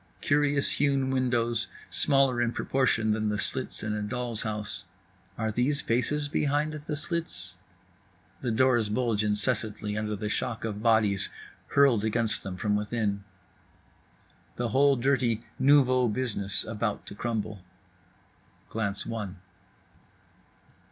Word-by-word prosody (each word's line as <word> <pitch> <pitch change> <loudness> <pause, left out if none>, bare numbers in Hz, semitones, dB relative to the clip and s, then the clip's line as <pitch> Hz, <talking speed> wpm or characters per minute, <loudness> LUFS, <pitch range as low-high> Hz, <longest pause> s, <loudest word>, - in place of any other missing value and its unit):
Curious 145 -1 +2
hewn 135 -2 +1
windows, 120 -3 0 0.2
smaller 135 -3 +3
in 120 0 0
proportion 115 -5 +1
than 110 0 0
the 105 - -1
slits 130 +4 -1
in 110 0 -2
a 105 - -2
doll's 120 +1 -1
house. 105 -3 -2 0.5
Are 110 -1 -1
these 135 +6 +1
faces 145 +5 0
behind 145 +1 0
the 150 0 -5
slits? 150 - -3 0.9
The 125 - -1
doors 120 -1 +3
bulge 110 -1 +1
incessantly 105 -1 0
under 105 0 -2
the 105 +1 -4
shock 115 +1 -2
of 105 -2 -4
bodies 110 -4 +2 0.4
hurled 135 -7 +4
against 110 0 0
them 95 -1 -6
from 105 +1 0
within. 105 -1 -1 1.3
The 120 -1 -2
whole 140 +4 +4
dirty 120 -3 +1
nouveau 130 -2 +5
business 105 -4 -1
about 110 -1 -3
to - - -8
crumble. 110 -2 -3 1.1
Glance 105 -2 -1
one. 105 -5 -5
115 Hz, 125 wpm, -28 LUFS, 105-130 Hz, 1.3 s, nouveau